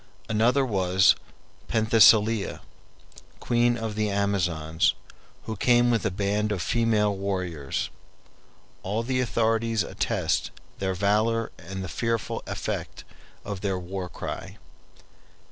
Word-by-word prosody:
Another 120 +5 +2
was 95 -4 +4 0.5
Penthesilea, 110 -1 +4 0.8
queen 120 0 +2
of 110 -1 -4
the 105 0 0
Amazons, 90 -6 +1 0.5
who 110 - -5
came 120 +3 +3
with 115 -3 +1
a - - +1
band 105 +2 -1
of 100 - -1
female 105 0 +1
warriors. 90 -7 -3 0.9
All 105 +4 -2
the 130 +1 -1
authorities 115 -2 +1
attest - - -1 0.3
their 95 -1 -1
valor 110 +4 +1
and 95 +2 -6
the - - -4
fearful 115 +4 -2
effect - - -4 0.4
of 100 -2 -5
their 95 -2 -1
war 90 0 -5
cry. - - -6
105 Hz, 110 wpm, -26 LUFS, 95-115 Hz, 0.9 s, was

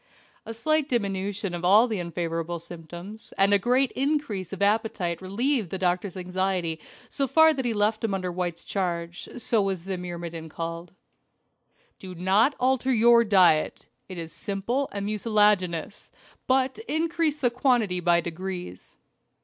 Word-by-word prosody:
A 225 - -5
slight 310 +4 0
diminution 200 -3 -2
of 175 0 -5
all 205 +7 +6
the 220 -5 -2
unfavorable 170 -1 -3
symptoms, 175 +5 -10
and 195 +1 +4
a 200 - +5
great 250 +5 +2
increase 275 - -2
of 195 - -6
appetite 200 -5 0
relieved 220 - -1
the 190 - -3
doctor's 185 +1 -1
anxiety 180 -2 -2 0.3
so 275 - -1
far 320 +3 +6
that 265 -4 -3
he 240 - +1
left 215 +2 +1
him 210 -3 0
under 185 -1 -3
White's 175 -1 -4
charge. 175 -2 -3
So 230 -2 +1
was 190 -3 -2
the 190 -1 -4
myrmidon 170 -2 -6
called. 165 +2 -6 1.1
"Do 185 -1 -9
not 195 - +3
alter 260 +1 +2
your 235 0 +6
diet 185 -7 +3 0.2
it 185 - -7
is 165 -2 -7
simple 205 - -2
and 200 0 -4
mucilaginous 210 -3 +1 0.4
but 260 +3 +1
increase 325 -1 0
the 250 -5 +1
quantity 240 -7 +1
by 175 -1 +3
degrees." 175 - -7
195 Hz, 150 wpm, -26 LUFS, 175-235 Hz, 1.1 s, all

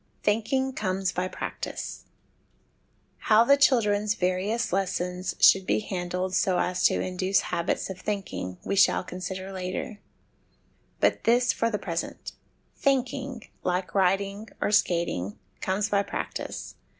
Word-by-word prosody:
Thinking 260 +5 +1
comes 190 -4 -1
by 180 +1 -1
Practice. - - -6 1.1
How 220 0 +5
the 280 +4 +6
chil 275 -4 +5
dren's 210 0 +1
various 190 +5 0
lessons 180 -1 -1
should 190 -1 +6
be - - +3
handled 180 -2 -3
so 185 -1 +2
as 180 0 0
to - - +4
induce 185 +1 +1
habits 170 -1 0
of 190 -1 -7
thinking, 190 - -4
we - - 0
shall 195 - +4
consider 185 +1 -6
later; 190 +4 -4 1.0
but - - +2
this 245 +2 +4
for 230 - 0
the 210 - -1
present: 170 -4 -4 0.4
thinking, 260 -2 -1 0.2
like 180 0 -1
writing 195 +2 +1
or - - 0
skating, 170 - +1 0.2
comes 195 +3 0
by 200 -1 +3
practice. - - -5
195 Hz, 130 wpm, -27 LUFS, 180-215 Hz, 1.1 s, the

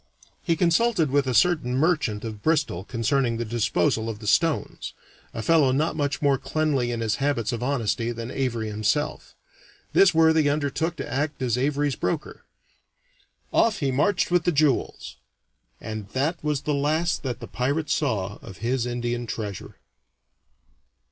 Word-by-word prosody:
He 170 - +1
consulted 170 - +2
with 140 -1 +2
a 125 - 0
certain 140 -2 +3
merchant 140 -9 +1
of 110 -2 -6
Bristol 150 - 0
concerning 115 +2 0
the 120 - -3
disposal 115 -1 0
of 110 - -5
the 105 - -11
stones 160 +8 0 0.4
a 115 - -5
fellow 155 -4 +4
not 155 +5 0
much 145 -1 -2
more 140 -2 +3
cleanly 150 -6 0
in 120 -1 -3
his 110 -1 0
habits 135 -5 0
of 120 -1 -4
honesty 120 -3 -1
than 115 +1 -6
Avary 120 -5 -2
himself. 110 +8 -2 0.6
This 195 - +6
worthy 160 -2 +4
undertook 155 +3 -1
to - - -5
act 145 0 -2
as 120 -2 +1
Avary's 140 +1 0
broker. 160 -3 -3 1.1
Off 225 -2 +3
he 140 -3 0
marched 175 +8 +1
with 175 -1 +3
the 175 - +2
jewels, 150 -4 0 0.6
and 110 -2 -6
that 145 +6 -1
was 150 -2 0
the 150 - -1
last 155 +4 0
that 125 -5 -4
the - - -7
pirate 145 +5 -1
saw 105 - -1
of 95 - -11
his 120 +1 -1
Indian 120 0 -3
treasure. 105 -4 -6
135 Hz, 155 wpm, -25 LUFS, 115-155 Hz, 1.1 s, This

